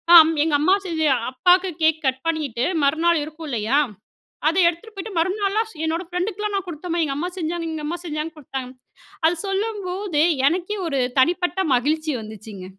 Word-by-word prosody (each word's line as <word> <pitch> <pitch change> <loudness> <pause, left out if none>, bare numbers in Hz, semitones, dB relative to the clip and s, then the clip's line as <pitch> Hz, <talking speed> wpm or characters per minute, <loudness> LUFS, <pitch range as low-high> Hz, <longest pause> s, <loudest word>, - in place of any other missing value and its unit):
"ஆம். 325 -1 +9
எங்க 315 -2 +2
அம்மா 375 +5 +4
செஞ்ச 325 -2 -2 0.3
அப்பாக்கு 360 +7 +3
கேக் 315 0 +3
கட் 260 0 -1
பண்ணிட்டு, 280 -7 -1 0.2
மறுநாள் 325 +3 +3
இருக்குல்லையா? 285 -5 -1 0.7
அத 330 - 0
எடுத்துட்டு 350 +6 -6
போய்ட்டு, 395 +2 -6
மறுநாள்லாம் 400 +5 0
ஸ் 360 - -16
என்னோட 325 +2 -1
ஃப்ரெண்டுக்கலாம் 405 +4 -2
நான் 390 -2 -1
குடுத்தேன்ம்மா. 345 +1 -3
எங்க 275 -3 -2
அம்மா 340 +5 -2
செஞ்சாங்க 335 0 -2
எங்க 315 -1 -5
அம்மா 345 +3 -3
செஞ்சாங்க, 310 0 -3
குடுத்தாங்க." 265 -3 -6 0.6
அது 340 +2 +2
சொல்லும்போதே, 390 -5 -1 0.2
எனக்கே 365 +4 -2
ஒரு 275 -4 0 0.2
தனிப்பட்ட 355 +5 +1 0.2
மகிழ்ச்சி 310 +4 0
வந்துச்சுங்க. 215 -3 -9
330 Hz, 155 wpm, -22 LUFS, 300-365 Hz, 0.7 s, ஆம்